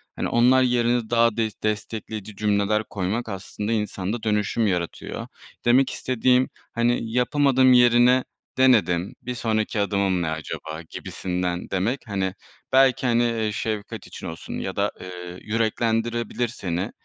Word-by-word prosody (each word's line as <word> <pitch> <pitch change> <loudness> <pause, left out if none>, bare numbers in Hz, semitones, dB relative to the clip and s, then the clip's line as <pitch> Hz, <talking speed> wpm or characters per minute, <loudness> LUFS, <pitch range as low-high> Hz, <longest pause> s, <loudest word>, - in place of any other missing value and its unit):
hani, - - -2
onlar 125 +2 +5
yerine 120 -2 +1
daha 115 -1 +3
des 110 -2 0
destekleyici 110 0 -4
cümleler 105 +1 +1
koymak 100 +4 -2
aslında 105 +2 -4
insanda 105 0 -2
dönüşüm 105 +1 +1
yaratıyor. 90 -3 -3 0.4
Demek 125 +3 +5
istediğim, 125 +1 +1 0.2
hani, 115 -1 0
yapamadım 130 +1 +4
yerine 125 +1 +5 0.3
denedim, 105 -9 +3
bir 125 0 -5
sonraki 110 -1 -1
adımım 100 -2 +1
ne 85 - -1
acaba 80 0 -5
gibisinden 90 -1 -3
demek, 105 +8 0
hani, 95 -2 -1 0.4
belki, 135 -1 +4
hani, 120 0 +3
eee, 115 -2 0
şefkat 105 0 -4
için - - -8
olsun 80 - -7
ya - - -4
da, - - +1
eee, 90 -1 -8
yüreklendirebilir 115 +2 0
seni. 95 -2 -3
110 Hz, 130 wpm, -24 LUFS, 100-120 Hz, 0.4 s, onlar